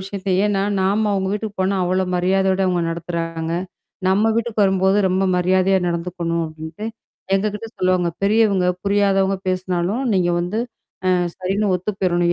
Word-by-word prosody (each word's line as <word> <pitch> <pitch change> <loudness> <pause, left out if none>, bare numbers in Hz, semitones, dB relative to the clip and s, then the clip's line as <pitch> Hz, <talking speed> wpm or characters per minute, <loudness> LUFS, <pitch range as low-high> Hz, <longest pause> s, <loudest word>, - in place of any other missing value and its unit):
விஷயத்தையும், 190 -1 -1
ஏன்னா 195 -1 +1 0.2
நாம 205 +3 +2
அவங்க 190 -1 0
வீட்டுக்கு 210 0 -4
போனா 190 +1 +1
அவ்ளோ 185 +1 +1
மரியாதையோட 190 +1 +2
அவங்க 175 -2 +1
நடத்துறாங்க. 165 -1 -3 0.6
நம்ம 205 +4 +3
வீட்டுக்கு 230 -2 0
வரும்போது 190 0 +2
ரொம்ப 185 +1 +1
மரியாதையா 185 +1 +3
நடந்துக்கணும் 170 -1 -2
அப்டின்ட்டு, 160 +6 -7 0.5
எங்ககிட்ட 210 +2 -1
சொல்லுவாங்க 185 -1 +2
பெரியவங்க, 200 -3 +3 0.2
புரியாதவங்க 195 -1 +2
பேசினாலும் 185 +5 -1
நீங்க 180 -2 +2
வந்து 180 +5 -2 0.5
அ - - +4 0.3
சரின்னு 195 +3 -1
ஒத்து 180 +3 -2
போயிடணும், 175 -2 +2
190 Hz, 135 wpm, -20 LUFS, 180-200 Hz, 0.6 s, அ